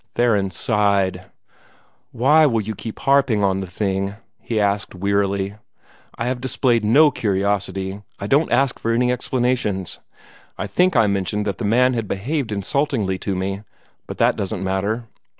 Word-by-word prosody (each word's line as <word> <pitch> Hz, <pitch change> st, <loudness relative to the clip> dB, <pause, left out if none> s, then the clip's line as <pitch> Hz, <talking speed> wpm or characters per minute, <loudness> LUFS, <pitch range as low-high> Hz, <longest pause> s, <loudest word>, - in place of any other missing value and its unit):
Theron 105 Hz, -5 st, +2 dB
sighed. 100 Hz, -1 st, 0 dB, 0.9 s
"Why 150 Hz, +6 st, +4 dB
will 115 Hz, -5 st, +1 dB
you 110 Hz, +1 st, -4 dB
keep 110 Hz, +2 st, -7 dB
harping 135 Hz, -6 st, +2 dB
on 95 Hz, -1 st, +1 dB
the 95 Hz, -, -5 dB
thing?" 95 Hz, +2 st, -2 dB, 0.2 s
he 115 Hz, -2 st, -2 dB
asked 100 Hz, -1 st, 0 dB
wearily. 100 Hz, +1 st, -1 dB, 0.6 s
"I 115 Hz, -, -3 dB
have 125 Hz, 0 st, -2 dB
displayed 125 Hz, -3 st, +1 dB
no 145 Hz, +8 st, +5 dB
curiosity. 100 Hz, -2 st, -1 dB, 0.2 s
I -, -, -6 dB
don't 140 Hz, +9 st, +2 dB
ask 135 Hz, -2 st, +2 dB
for 115 Hz, -, -1 dB
any 125 Hz, +1 st, +2 dB
explanations. 120 Hz, -6 st, -1 dB, 0.6 s
I -, -, -3 dB
think 180 Hz, -, +1 dB
I 115 Hz, -3 st, +5 dB
mentioned 100 Hz, +1 st, -1 dB
that 100 Hz, -, -3 dB
the 115 Hz, -, -2 dB
man 125 Hz, +4 st, +3 dB
had 115 Hz, -3 st, -2 dB
behaved 120 Hz, +6 st, -2 dB
insultingly 105 Hz, -2 st, -1 dB
to 100 Hz, -, -2 dB
me 95 Hz, +2 st, -3 dB, 0.5 s
but -, -, -7 dB
that -, -, +3 dB
doesn't 95 Hz, -1 st, -3 dB
matter. 100 Hz, +5 st, -1 dB
105 Hz, 155 wpm, -21 LUFS, 95-125 Hz, 0.9 s, no